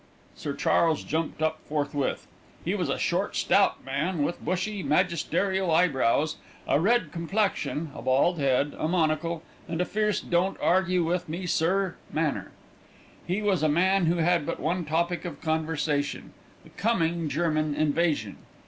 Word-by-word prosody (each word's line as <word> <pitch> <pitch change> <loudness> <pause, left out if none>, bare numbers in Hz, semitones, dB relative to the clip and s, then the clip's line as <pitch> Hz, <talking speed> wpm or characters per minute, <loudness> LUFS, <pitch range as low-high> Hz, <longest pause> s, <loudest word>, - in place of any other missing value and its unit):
Sir 140 -1 -4
Charles 165 -2 +2
jumped 160 0 -2
up 160 0 0
forthwith. 145 -2 -1 0.4
He - - 0
was - - -1
a - - 0
short, - - -1
stout - - +2
man, 150 +5 -1
with 170 - -3
bushy, 185 +4 -2
magisterial 180 +3 +1
eyebrows, 155 -3 +2 0.3
a - - +3
red 235 +8 +2
complexion, 170 -3 -1
a - - -8
bald 145 +7 +2
head, 140 +1 +1
a - - 0
monocle, 165 0 0 0.2
and 165 -1 -3
a 180 - +2
fierce 210 0 0
don't 180 +3 0
argue 185 0 +2
with 175 +1 -1
me 175 +4 -4
sir 180 +2 +1
manner. 155 -2 -1 0.8
He 190 +4 -1
was 195 -6 +2
a 155 - +3
man 185 +3 +3
who 170 - +3
had 170 -1 +2
but - - -4
one 170 +3 -1
topic 170 +3 0
of 175 - -6
conversation 155 -2 -1 0.3
the - - -17
coming 170 -7 0
German 155 0 0
invasion. 150 - 0
165 Hz, 150 wpm, -27 LUFS, 155-180 Hz, 0.8 s, a